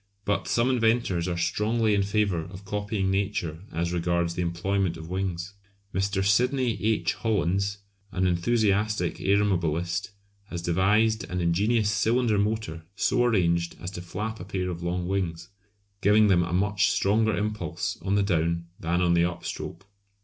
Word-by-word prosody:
But 100 Hz, -, 0 dB
some 120 Hz, +2 st, +2 dB
inventors 115 Hz, -7 st, +1 dB
are 90 Hz, -1 st, -2 dB
strongly 110 Hz, +5 st, +1 dB
in 100 Hz, -, +3 dB
favour 100 Hz, -3 st, +1 dB
of 95 Hz, +2 st, -11 dB
copying 100 Hz, -1 st, -1 dB
Nature 95 Hz, -5 st, -1 dB
as 85 Hz, +1 st, -2 dB
regards 85 Hz, 0 st, 0 dB
the 90 Hz, -, -2 dB
employment 90 Hz, +1 st, -1 dB
of 80 Hz, +1 st, -9 dB
wings. 95 Hz, 0 st, -3 dB, 0.4 s
Mr. 95 Hz, +1 st, 0 dB
Sydney 125 Hz, +2 st, +2 dB
H. 110 Hz, 0 st, +1 dB
Hollands, 100 Hz, -2 st, 0 dB, 0.3 s
an 95 Hz, 0 st, 0 dB
enthusiastic 100 Hz, 0 st, +1 dB
aeromobilist, 90 Hz, -2 st, +1 dB, 0.4 s
has 85 Hz, -4 st, -6 dB
devised 105 Hz, +6 st, +2 dB
an 90 Hz, +1 st, -4 dB
ingenious 105 Hz, +6 st, +2 dB
cylinder 115 Hz, 0 st, +2 dB
motor 105 Hz, -6 st, -1 dB
so 120 Hz, +4 st, +2 dB
arranged 85 Hz, -7 st, +1 dB
as 90 Hz, -, -6 dB
to 90 Hz, -, -6 dB
flap 105 Hz, +6 st, -5 dB
a -, -, -6 dB
pair 90 Hz, -1 st, -3 dB
of 85 Hz, 0 st, -6 dB
long 90 Hz, +1 st, -2 dB
wings, 90 Hz, -3 st, -2 dB, 0.5 s
giving 105 Hz, +1 st, +5 dB
them 90 Hz, -3 st, +4 dB
a 90 Hz, 0 st, -2 dB
much 100 Hz, +3 st, +2 dB
stronger 110 Hz, 0 st, +2 dB
impulse 95 Hz, -3 st, -3 dB
on 95 Hz, +1 st, 0 dB
the 100 Hz, -, +3 dB
down 85 Hz, -3 st, 0 dB
than 85 Hz, +2 st, 0 dB
on 85 Hz, -1 st, +3 dB
the 85 Hz, 0 st, +4 dB
up 90 Hz, 0 st, -4 dB
stroke. 95 Hz, -, -6 dB
95 Hz, 155 wpm, -26 LUFS, 85-105 Hz, 0.5 s, giving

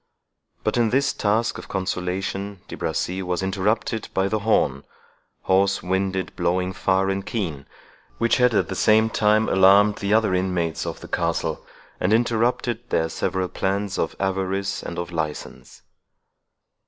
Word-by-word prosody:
But -, -, 0 dB
in 115 Hz, -2 st, +3 dB
this 135 Hz, +3 st, +2 dB
task 110 Hz, +3 st, 0 dB
of -, -, -10 dB
consolation 95 Hz, +1 st, -3 dB
De -, -, -7 dB
Bracy 85 Hz, +4 st, -2 dB
was 90 Hz, 0 st, -2 dB
interrupted 105 Hz, +3 st, -1 dB
by 95 Hz, 0 st, +2 dB
the 110 Hz, -, 0 dB
horn, 75 Hz, -11 st, +1 dB, 0.6 s
"hoarse 100 Hz, +1 st, +2 dB
winded 95 Hz, +1 st, -1 dB
blowing 90 Hz, +1 st, 0 dB
far 95 Hz, 0 st, +1 dB
and 95 Hz, 0 st, -2 dB
keen," 85 Hz, -, -4 dB, 0.5 s
which 115 Hz, 0 st, +2 dB
had 125 Hz, -3 st, +3 dB
at -, -, +2 dB
the -, -, -4 dB
same 110 Hz, +3 st, +4 dB
time 110 Hz, +1 st, +3 dB
alarmed 100 Hz, +2 st, +5 dB
the 100 Hz, 0 st, -2 dB
other 110 Hz, -3 st, +3 dB
inmates 90 Hz, -3 st, -1 dB
of -, -, -5 dB
the -, -, -9 dB
castle, -, -, -1 dB, 0.4 s
and 95 Hz, -, +1 dB
interrupted 120 Hz, +1 st, 0 dB
their 80 Hz, 0 st, +1 dB
several 95 Hz, +2 st, -1 dB
plans 100 Hz, +1 st, -2 dB
of -, -, -1 dB
avarice 95 Hz, 0 st, -1 dB
and 85 Hz, -, -6 dB
of 85 Hz, 0 st, -4 dB
license. 80 Hz, -3 st, -5 dB
95 Hz, 150 wpm, -23 LUFS, 90-110 Hz, 0.6 s, alarmed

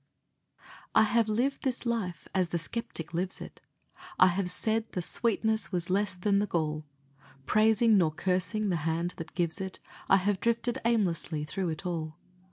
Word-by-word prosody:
I -, -, +7 dB
have 225 Hz, 0 st, +2 dB
lived 250 Hz, +6 st, 0 dB
this 255 Hz, -1 st, -2 dB
life 210 Hz, -9 st, -2 dB
as 185 Hz, -2 st, +2 dB
the 170 Hz, -, -2 dB
skeptic 170 Hz, -3 st, -5 dB
lives 180 Hz, +3 st, -1 dB
it; -, -, -10 dB, 0.6 s
I 185 Hz, -, +7 dB
have 180 Hz, +1 st, -1 dB
said 220 Hz, +4 st, 0 dB
the 180 Hz, -, -1 dB
sweetness 220 Hz, +2 st, 0 dB
was 180 Hz, 0 st, -2 dB
less 195 Hz, 0 st, +2 dB
than 200 Hz, +2 st, +2 dB
the 205 Hz, -, 0 dB
gall; 155 Hz, -3 st, -1 dB, 0.6 s
Praising, 220 Hz, 0 st, +4 dB
nor 165 Hz, -3 st, +3 dB
cursing, 190 Hz, +5 st, 0 dB
the 175 Hz, -, +1 dB
Hand 165 Hz, +3 st, -1 dB
that 165 Hz, -1 st, -8 dB
gives 175 Hz, +1 st, 0 dB
it, 190 Hz, -1 st, -5 dB, 0.3 s
I 195 Hz, -, +7 dB
have 195 Hz, 0 st, 0 dB
drifted 235 Hz, +3 st, 0 dB
aimlessly 175 Hz, -9 st, +1 dB
through 180 Hz, +4 st, -2 dB
it 160 Hz, +3 st, -5 dB
all. 160 Hz, -3 st, -3 dB
190 Hz, 170 wpm, -29 LUFS, 170-220 Hz, 0.6 s, I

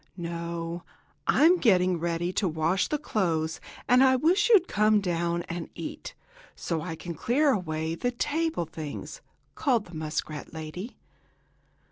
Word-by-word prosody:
"No, 170 Hz, 0 st, -4 dB, 0.5 s
I'm 335 Hz, +5 st, +5 dB
getting 185 Hz, -6 st, +3 dB
ready 170 Hz, +1 st, -1 dB
to 195 Hz, -, +1 dB
wash 165 Hz, +3 st, +1 dB
the 300 Hz, -, 0 dB
clothes, 165 Hz, -, -1 dB, 0.3 s
and 250 Hz, +2 st, +6 dB
I 260 Hz, -1 st, +5 dB
wish 335 Hz, -, +3 dB
you'd 390 Hz, -6 st, +6 dB
come 215 Hz, 0 st, +3 dB
down 170 Hz, -2 st, -1 dB
and 170 Hz, 0 st, -6 dB
eat, -, -, -7 dB, 0.4 s
so 165 Hz, -3 st, -2 dB
I 165 Hz, 0 st, -4 dB
can 170 Hz, +1 st, -6 dB
clear 275 Hz, -, +2 dB
away 160 Hz, -6 st, -2 dB
the 245 Hz, +9 st, -1 dB
table 295 Hz, -, -1 dB
things!" 160 Hz, -, -7 dB, 0.3 s
called 240 Hz, -7 st, +1 dB
the 175 Hz, -, -14 dB
muskrat 155 Hz, -1 st, -4 dB
lady. 160 Hz, +8 st, -7 dB
175 Hz, 140 wpm, -27 LUFS, 165-245 Hz, 0.5 s, and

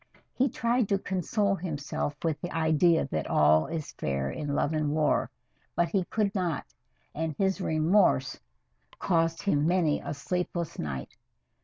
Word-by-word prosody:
He 265 Hz, +2 st, +2 dB
tried 235 Hz, -1 st, 0 dB
to 200 Hz, -, +3 dB
console 195 Hz, +2 st, 0 dB
himself 150 Hz, -5 st, -3 dB
with 160 Hz, -3 st, -1 dB
the 175 Hz, -, -4 dB
idea 160 Hz, +1 st, +3 dB
that 80 Hz, -1 st, -2 dB
all 75 Hz, +1 st, +4 dB
is 160 Hz, -3 st, -4 dB
fair 70 Hz, 0 st, -2 dB
in 145 Hz, -, -3 dB
love 145 Hz, -, +1 dB
and 155 Hz, -1 st, 0 dB
war, 150 Hz, 0 st, +1 dB, 0.5 s
but 170 Hz, -1 st, +2 dB
he 185 Hz, 0 st, 0 dB
could 205 Hz, +1 st, 0 dB
not, 175 Hz, -7 st, -1 dB, 0.5 s
and 160 Hz, -1 st, -3 dB
his 195 Hz, 0 st, +1 dB
remorse 160 Hz, -4 st, +2 dB, 0.6 s
caused 165 Hz, -2 st, +1 dB
him 150 Hz, -6 st, +2 dB
many 170 Hz, -4 st, +2 dB
a -, -, -5 dB
sleepless 175 Hz, +2 st, -3 dB
night. 65 Hz, -5 st, -5 dB
165 Hz, 150 wpm, -28 LUFS, 145-185 Hz, 0.6 s, all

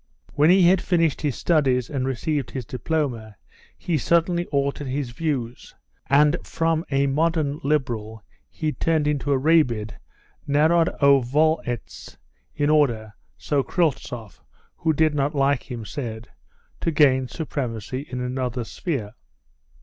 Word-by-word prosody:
When 150 Hz, +2 st, +4 dB
he 185 Hz, +1 st, +6 dB
had 185 Hz, +1 st, +4 dB
finished 165 Hz, -5 st, +1 dB
his 145 Hz, -4 st, -1 dB
studies 130 Hz, -7 st, +1 dB
and 135 Hz, -3 st, -2 dB
received 135 Hz, +2 st, -2 dB
his 130 Hz, -3 st, -5 dB
diploma 125 Hz, -5 st, -3 dB, 0.4 s
he 165 Hz, -4 st, -1 dB
suddenly 170 Hz, +4 st, +1 dB
altered 140 Hz, 0 st, -1 dB
his 130 Hz, -1 st, -3 dB
views, 125 Hz, -4 st, -4 dB, 0.3 s
and 150 Hz, +4 st, +4 dB
from 165 Hz, 0 st, 0 dB
a 140 Hz, 0 st, +2 dB
modern 150 Hz, +1 st, 0 dB
liberal 115 Hz, -7 st, -2 dB, 0.3 s
he 155 Hz, -1 st, -2 dB
turned 160 Hz, -1 st, 0 dB
into 145 Hz, -1 st, -1 dB
a 140 Hz, -, +3 dB
rabid 130 Hz, -8 st, +2 dB, 0.6 s
Narodovoletz, 145 Hz, -, +2 dB, 0.4 s
in 145 Hz, +1 st, +1 dB
order 120 Hz, -8 st, +1 dB, 0.2 s
(so 145 Hz, -2 st, 0 dB
Kryltzoff, 130 Hz, -, -2 dB, 0.4 s
who 160 Hz, -, +1 dB
did 155 Hz, 0 st, +2 dB
not 145 Hz, +1 st, -1 dB
like 140 Hz, -1 st, +1 dB
him, 120 Hz, -3 st, -6 dB
said) 115 Hz, -3 st, -6 dB, 0.5 s
to -, -, -1 dB
gain 135 Hz, -5 st, +3 dB
supremacy 130 Hz, -, -4 dB
in 125 Hz, -1 st, -4 dB
another 125 Hz, -1 st, -2 dB
sphere. 115 Hz, -, -4 dB
140 Hz, 125 wpm, -23 LUFS, 125-155 Hz, 0.6 s, he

